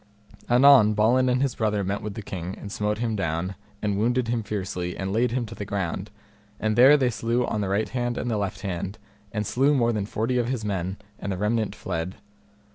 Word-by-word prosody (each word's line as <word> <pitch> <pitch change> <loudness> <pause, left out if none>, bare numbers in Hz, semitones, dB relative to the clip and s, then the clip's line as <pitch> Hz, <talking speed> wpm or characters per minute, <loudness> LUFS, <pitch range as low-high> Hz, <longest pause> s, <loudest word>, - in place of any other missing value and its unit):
Anon 125 -4 +7
Balin 125 +5 +3
and 125 +2 +2
his 135 -3 0
brother 105 -2 0
met 100 +2 -2
with 105 -2 -5
the 110 - -6
king, 95 0 -5
and 100 - -8
smote 105 +1 -1
him 115 -1 -1
down, 85 0 -2 0.3
and 100 -1 0
wounded 120 +2 +1
him 120 -1 0
fiercely, 95 -4 -4
and 95 0 -3
laid 120 +3 +2
him 120 +1 -1
to 110 - -9
the 105 - -6
ground; 95 -1 -3 0.5
and 110 0 0
there 130 +5 +8
they 130 -3 +2
slew 120 +2 0
on 105 - -2
the 100 - -1
right 100 +3 0
hand 120 -1 -2
and 120 - -2
the - - +1
left 100 -1 -3
hand, 95 0 -4 0.3
and 105 -1 -2
slew 135 +7 +2
more 120 -3 +2
than 105 -2 -2
forty 115 +4 0
of 120 - 0
his 125 -5 -2
men, 95 -1 -2 0.2
and 100 - -3
the 95 - -2
remnant 110 +2 0
fled. 85 +3 -4
105 Hz, 220 wpm, -25 LUFS, 100-120 Hz, 0.5 s, there